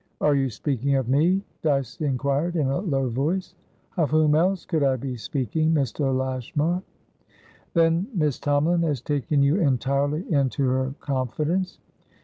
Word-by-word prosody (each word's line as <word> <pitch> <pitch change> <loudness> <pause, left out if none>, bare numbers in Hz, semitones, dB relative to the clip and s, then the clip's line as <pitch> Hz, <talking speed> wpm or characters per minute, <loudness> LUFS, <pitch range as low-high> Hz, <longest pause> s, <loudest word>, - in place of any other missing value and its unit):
"Are 150 - +3
you 135 -1 +1
speaking 140 +3 -1
of 130 -3 0
me?" 165 +9 +2 0.2
Dyce 140 -5 -1
inquired, 140 +4 0
in 155 -4 +1
a 135 +3 0
low 135 -9 0
voice. 165 +10 -1 0.4
"Of 160 -4 +2
whom 155 -1 +3
else 180 +4 +2
could 160 -4 -1
I 135 -2 +3
be 130 0 -4
speaking, 140 +7 -1
Mr. 135 0 0
Lashmar?" 130 +6 -1 0.9
"Then 165 +3 +3
Miss 155 - 0
Tomalin 150 +4 +2
has 150 -5 0
taken 140 +2 0
you 140 +5 +3
entirely 140 - +1
into 135 -1 +1
her 130 +1 0
confidence?" 150 +7 -1
145 Hz, 145 wpm, -24 LUFS, 135-160 Hz, 0.9 s, Are